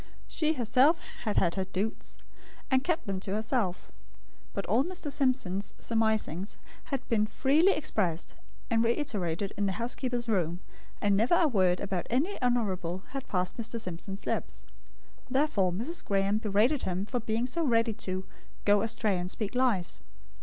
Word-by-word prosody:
She 315 -1 +1
herself 270 +5 +4 0.3
had 210 - 0
had 170 - +3
her 190 -1 -1
"doots," 195 +4 -3 0.5
and 260 0 +4
kept 335 +1 0
them 195 -2 -2
to 195 +1 -3
herself; 215 -4 -1 0.6
but 200 - -3
all 230 +7 +3
Mr. 350 -3 -4
Simpson's 250 -9 0
surmisings 220 -5 0 0.3
had 270 -2 -3
been 215 -3 +2
freely 305 - +4
expressed 185 - -1 0.4
and 225 0 +4
reiterated 205 - -1
in 200 0 +1
the 190 - 0
housekeeper's 240 +3 -2
room; 175 -5 +1 0.4
and 205 -1 +3
never 225 - +4
a 340 -2 +5
word 185 -8 +3
about 190 -3 -2
any 295 - 0
honourable 190 -8 0
lead 275 -1 -4
passed 180 -1 -1
Mr. 230 0 -3
Simpson's 195 0 -5
lips. - - -2 0.6
Therefore 255 -9 +2
Mrs. 235 - -3
Graem 200 +1 +1
berated 220 +7 +2
him 185 +1 -1
for 245 +3 -2
being 225 +1 -1
so 330 +7 -1
ready 230 -4 +3
to 185 -2 -4 0.4
"go 205 0 +5
astray 215 -4 0
and 180 +1 -3
speak 205 +1 -2
lies." 215 - +1
220 Hz, 155 wpm, -30 LUFS, 190-255 Hz, 0.6 s, a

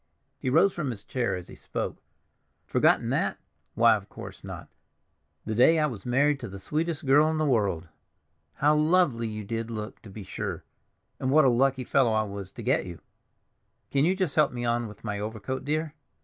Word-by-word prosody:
He 130 - -1
rose 190 +9 +4
from 155 -6 -3
his 110 -4 -6
chair 120 -8 -1
as 90 -1 -7
he - - -12
spoke. - - -5 0.6
"Forgotten - - +2
that? - - 0 0.4
Why, - - +6
of - - -7
course - - -10
not; - - -8 0.8
the 110 - -2
day 130 +9 +5
I 155 - +3
was 120 -7 -5
married 140 +3 +3
to 120 - -6
the 100 - -8
sweetest 155 - -2
girl 145 +3 +5
in 160 - -1
the 155 - +1
world! 100 - +1 0.7
How 150 +2 +3
lovely 150 -7 +3
you 110 -1 -5
did 115 +2 -4
look, 110 -1 -6
to 110 - -12
be 100 +1 -8
sure, - - -5 0.6
and 130 - -1
what 155 +1 +5
a - - +6
lucky 130 +2 +2
fellow 125 -2 +2
I 110 0 +2
was 100 -2 -7
to - - -8
get - - +1
you! 85 -3 -8 0.9
Can 140 0 +2
you 180 +4 +3
just 185 -7 -1
help 150 -2 +4
me 120 -1 -4
on 120 0 0
with 105 -1 -13
my 105 -2 -3
overcoat, 110 +4 -4
dear? 155 +1 -1
125 Hz, 200 wpm, -27 LUFS, 110-150 Hz, 0.9 s, Why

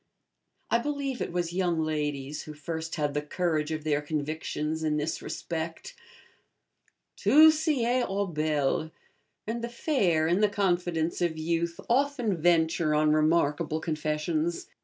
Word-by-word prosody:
I 235 - +4
believe 280 -1 -3
it - - -2
was 175 -1 -2
young 175 -3 +1
ladies 150 -2 -2
who 155 - -9
first 160 +2 -5
had 145 -2 -1
the 150 - 0
courage 155 0 -1
of 155 -1 -3
their 150 -1 +1
convictions 155 +1 -3
in 155 -1 0
this 150 +2 -2
respect. 165 - -5 1.2
'Tout 315 +2 +7
sied 255 -6 +1
aux 200 +1 0
belles,' 155 -2 0 0.6
and 230 +2 -3
the 235 - -2
fair, 195 - +1
in 175 +3 +2
the 210 - +4
confidence 175 -5 0
of 170 -2 0
youth, 170 +1 -1
often 250 -4 +1
venture 165 -1 +2
on 150 0 +3
remarkable 155 0 +2
confessions. 155 +1 -2
165 Hz, 140 wpm, -28 LUFS, 155-190 Hz, 1.2 s, Tout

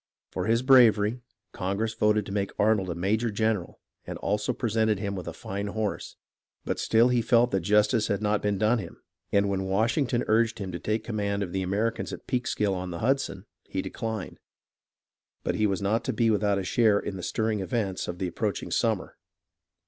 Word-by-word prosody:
For - - -3
his 115 +2 +2
bravery 120 -3 +5 0.3
Congress 100 +4 -2
voted 105 -2 +2
to 95 - -7
make 100 -1 -2
Arnold 105 -3 +2
a 85 - -2
major 105 +7 0
general 110 -3 -1 0.3
and - - -5
also 105 +4 -1
presented 110 -3 +1
him 100 0 -3
with 95 -2 -6
a - - -3
fine 100 +1 -5
horse; 105 0 -3 0.5
but - - -2
still 115 +2 +4
he 125 -1 +2
felt 120 +1 +3
that 95 - +2
jus 105 +4 +4
tice 110 -3 0
had 100 - 0
not 105 -1 0
been 105 -1 0
done 110 +4 +2
him, - - -8 0.3
and 100 0 +3
when 95 -1 -1
Washington 115 +5 +1
urged 110 +1 +2
him 95 -3 -5
to 85 - -5
take 110 +1 -1
command 100 -2 -2
of 90 - -5
the 95 - -1
Americans 110 +5 -1
at - - -8
Peekskill 105 -5 0
on 90 -1 -4
the 85 - -5
Hudson, 115 -3 -1 0.2
he 95 - -2
declined. 110 -4 -5 1.0
But - - 0
he 110 - +2
was 100 0 -2
not 110 +4 +1
to - - -1
be 115 -2 +2
without 105 -1 +2
a 100 - -2
share 105 +2 +3
in 100 - -4
the 95 - -6
stirring 110 +2 -1
events 95 -1 -2
of 90 - -4
the 95 - -2
approaching 85 - -3
summer. - - 0
105 Hz, 200 wpm, -27 LUFS, 100-115 Hz, 1.0 s, bravery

